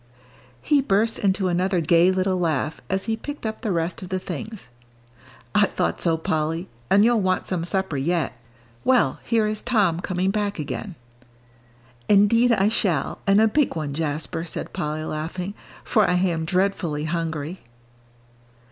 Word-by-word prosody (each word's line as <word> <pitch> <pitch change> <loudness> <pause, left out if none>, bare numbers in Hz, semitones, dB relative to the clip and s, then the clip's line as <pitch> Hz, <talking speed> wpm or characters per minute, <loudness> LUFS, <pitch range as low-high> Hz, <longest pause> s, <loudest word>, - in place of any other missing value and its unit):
He 290 -2 +3
burst 220 -1 +1
into 195 -1 +1
another 180 +1 +1
gay 170 +2 +4
little 185 0 +1
laugh, 160 -3 -1
as 190 +1 0
he 225 - -1
picked 290 +3 -7
up 220 0 -4
the 215 - -1
rest 170 +1 -2
of 185 - -8
the 185 - -1
things. 215 - -7 0.9
"I 210 -1 +4
thought - - -2
so, 165 -2 +2
Polly, 160 +2 -1 0.2
and 200 +2 +5
you'll 235 -2 +3
want 185 -1 0
some 175 -3 -2
supper 190 -4 -1
yet. 165 +3 0 0.5
Well, 255 -1 +3
here 225 -2 +2
is 215 0 -2
Tom 205 -9 +2
coming 185 +1 -1
back 205 0 -1
again." 165 +4 -5 1.1
"Indeed 210 +4 +5
I 205 -3 +3
shall, 200 -6 0
and 195 +1 +5
a 220 - +5
big 285 - +1
one, 150 -3 -3
Jasper," 155 +2 -3
said 170 - -6
Polly, 155 +1 -3
laughing, 165 +5 -4 0.3
"for 215 -3 +3
I - - +3
am 175 -3 0
dreadfully 180 -4 0
hungry." 165 +1 -3
185 Hz, 155 wpm, -23 LUFS, 165-210 Hz, 1.1 s, and